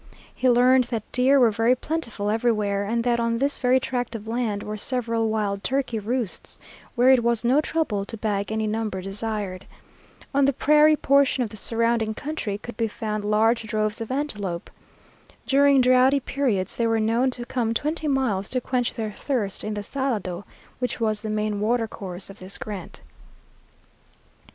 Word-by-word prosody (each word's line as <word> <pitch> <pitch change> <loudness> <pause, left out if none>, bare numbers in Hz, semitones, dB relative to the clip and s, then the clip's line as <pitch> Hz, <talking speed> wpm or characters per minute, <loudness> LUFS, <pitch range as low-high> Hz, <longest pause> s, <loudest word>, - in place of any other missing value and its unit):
He 255 - +1
learned 250 +1 +5
that 230 -3 -5
deer 265 +2 +4
were 240 -3 +5
very 230 +3 +3
plentiful 240 -8 -2
everywhere, 210 -3 +1
and 230 +3 -1
that 240 -1 +1
on 230 0 0
this 280 +3 0
very 255 0 +3
tract 245 -2 -3
of 220 -1 -7
land 225 -3 -2
were 210 - -5
several 230 0 -1
wild 205 -2 -1
turkey 260 -4 -1
roosts, 230 0 -3 0.4
where 250 +1 +5
it 260 -2 +5
was 235 -1 +1
no 260 +5 +4
trouble 305 -12 -1
to 225 - -7
bag 205 -1 -2
any 220 0 -1
number 215 -2 -2
desired. 195 -1 -4 0.7
On 280 0 +4
the 275 - +2
prairie 300 +3 +5
portion 275 -3 +3
of 220 - -5
the - - -9
surrounding 230 +1 0
country 285 -9 -4
could 230 +2 -10
be 230 - +1
found 215 0 -4
large 220 +3 +2
droves 215 0 -1
of 225 - -5
antelope. 210 -11 -3 0.7
During 275 0 +5
drouthy 255 +2 +5
periods 255 -8 -1
they 235 - +1
were 225 0 +2
known 230 +4 +2
to 245 -1 -4
come 240 -3 -1
twenty 305 +4 -1
miles 245 -9 0
to 255 - 0
quench 250 -1 -1
their 220 -2 -4
thirst 210 -4 -2
in 215 0 -3
the 205 - -4
Salado, 205 -8 -3 0.3
which 250 0 -2
was 215 -2 0
the 220 - -4
main 215 -1 -1
watercourse 210 -5 -2
of 195 - -14
this 185 +1 -5
grant. 200 -5 -7
230 Hz, 175 wpm, -24 LUFS, 210-255 Hz, 0.7 s, learned